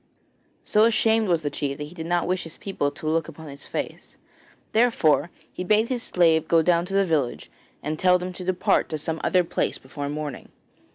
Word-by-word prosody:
So 215 +1 +4
ashamed 225 -1 +3
was 170 -3 +1
the 145 - -2
chief 140 -1 -3
that 150 - -5
he 150 +3 -9
did 165 -2 -6
not 175 0 +1
wish 185 0 0
his 165 - -7
people 190 -7 -2
to 150 - -10
look 160 0 +1
upon 160 -1 -10
his 140 0 -10
face, - - -6 0.5
therefore 180 -10 +3 0.2
he - - -4
bade 215 +4 +2
his 250 -2 -1
slave 165 -5 +2
go 165 -1 +4
down 170 0 +2
to 195 +2 -4
the 195 0 +4
village 145 - -1 0.3
and 155 +1 -3
tell 180 -1 +5
them 180 +1 -5
to 180 - -7
depart 185 0 +1
to 155 - -2
some 160 +2 -3
other 180 -1 +3
place 165 - -2
before 140 +2 -6
morning. 150 -2 -5
165 Hz, 210 wpm, -24 LUFS, 150-185 Hz, 0.5 s, tell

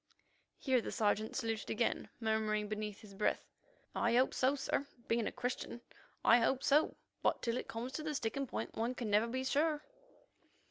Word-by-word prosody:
Here 260 -3 +2
the - - -5
Sergeant 215 -1 +1
saluted 225 -4 -2
again, 230 +2 0
murmuring 215 -2 +1
beneath 210 -1 -4
his 210 -2 -12
breath, 205 +2 0 0.5
"I - - +2
hope 255 +2 +4
so, 265 +2 +3
sir. 280 0 -1 0.2
Being 230 -1 +1
a - - -2
Christian, 245 -1 -3 0.5
I 235 - +8
hope 260 +3 +2
so, 295 +3 +3 0.2
but - - +1
till 230 -1 +1
it - - -3
comes 235 +3 -4
to 270 - -4
the 305 -1 -2
sticking 270 +2 -1
point, - - -4
one 235 +3 -1
can 230 -4 -3
never 210 +3 +4
be 260 +2 -2
sure." 300 +2 +1
235 Hz, 180 wpm, -35 LUFS, 220-265 Hz, 0.5 s, I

